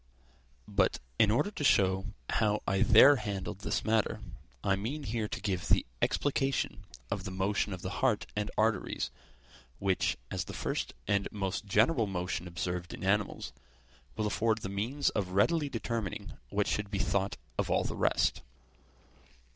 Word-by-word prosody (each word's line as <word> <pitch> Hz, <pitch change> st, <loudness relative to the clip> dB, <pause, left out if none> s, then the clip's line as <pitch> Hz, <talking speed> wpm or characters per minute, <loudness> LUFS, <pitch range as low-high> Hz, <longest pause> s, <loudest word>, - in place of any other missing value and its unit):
But, -, -, +2 dB, 0.2 s
in 105 Hz, -, +6 dB
order 120 Hz, -, +2 dB
to 175 Hz, -, -5 dB
show 95 Hz, -5 st, +3 dB, 0.2 s
how 105 Hz, -1 st, +1 dB
I 95 Hz, 0 st, +2 dB
there 140 Hz, +6 st, +8 dB
handled 100 Hz, -2 st, -4 dB
this -, -, -2 dB
matter, 110 Hz, -1 st, +1 dB, 0.4 s
I 100 Hz, -, +3 dB
mean 125 Hz, +10 st, -4 dB
here 110 Hz, -3 st, -2 dB
to -, -, -4 dB
give 95 Hz, -4 st, -2 dB
the -, -, +4 dB, 0.2 s
explication 135 Hz, -6 st, 0 dB, 0.3 s
of 100 Hz, -2 st, -2 dB
the 95 Hz, -, -4 dB
motion 95 Hz, +3 st, 0 dB
of 95 Hz, -1 st, -6 dB
the 95 Hz, -, -3 dB
heart 125 Hz, -6 st, +2 dB
and 105 Hz, 0 st, -1 dB
arteries, 110 Hz, 0 st, +1 dB, 0.7 s
which, 95 Hz, -1 st, +1 dB
as -, -, -2 dB
the -, -, -7 dB
first -, -, -2 dB
and 100 Hz, -1 st, +2 dB
most 100 Hz, 0 st, -3 dB
general 110 Hz, +4 st, +3 dB
motion 90 Hz, -1 st, -3 dB
observed 90 Hz, 0 st, -3 dB
in -, -, -10 dB
animals, 100 Hz, +1 st, 0 dB, 0.6 s
will 110 Hz, -, -1 dB
afford 110 Hz, +1 st, +1 dB
the 95 Hz, -, -3 dB
means 120 Hz, +9 st, 0 dB
of 95 Hz, -4 st, -2 dB
readily 145 Hz, -, +3 dB
determining 105 Hz, -, -3 dB, 0.2 s
what -, -, +1 dB
should 105 Hz, -1 st, -1 dB
be 100 Hz, -, -2 dB
thought 95 Hz, +2 st, 0 dB, 0.2 s
of -, -, 0 dB
all -, -, +2 dB
the -, -, -3 dB
rest. -, -, +2 dB
105 Hz, 160 wpm, -31 LUFS, 95-115 Hz, 0.7 s, there